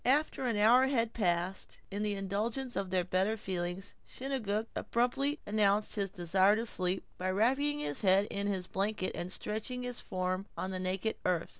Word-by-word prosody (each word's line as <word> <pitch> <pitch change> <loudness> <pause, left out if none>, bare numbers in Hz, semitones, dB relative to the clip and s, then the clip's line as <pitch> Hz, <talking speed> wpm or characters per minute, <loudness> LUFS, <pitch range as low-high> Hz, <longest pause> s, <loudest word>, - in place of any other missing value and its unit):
After 275 0 +2
an 230 -3 0
hour 240 +5 +6
had 230 -4 +1
passed 180 -2 -1
in 205 +1 -2
the 210 -1 +1
indulgence 215 +7 -2
of 195 -1 -2
their 180 -1 +1
better 190 +5 +1
feelings, 185 0 -3
Chingachgook 225 -6 -2
abruptly 270 +5 0
announced 210 0 +2
his 200 -2 0
desire 190 +2 +3
to 225 +2 -1
sleep, 185 -3 0
by 185 +1 -1
wrapping 265 +9 +2
his 145 - -1
head 195 0 +5
in 200 0 -1
his 190 -3 -1
blanket 195 0 -1
and 175 +1 -4
stretching 220 +6 -3
his 245 -1 -3
form 185 +1 -2
on 190 - -2
the 185 - -3
naked 185 +4 -1
earth. 180 -3 0
205 Hz, 175 wpm, -32 LUFS, 185-235 Hz, -, hour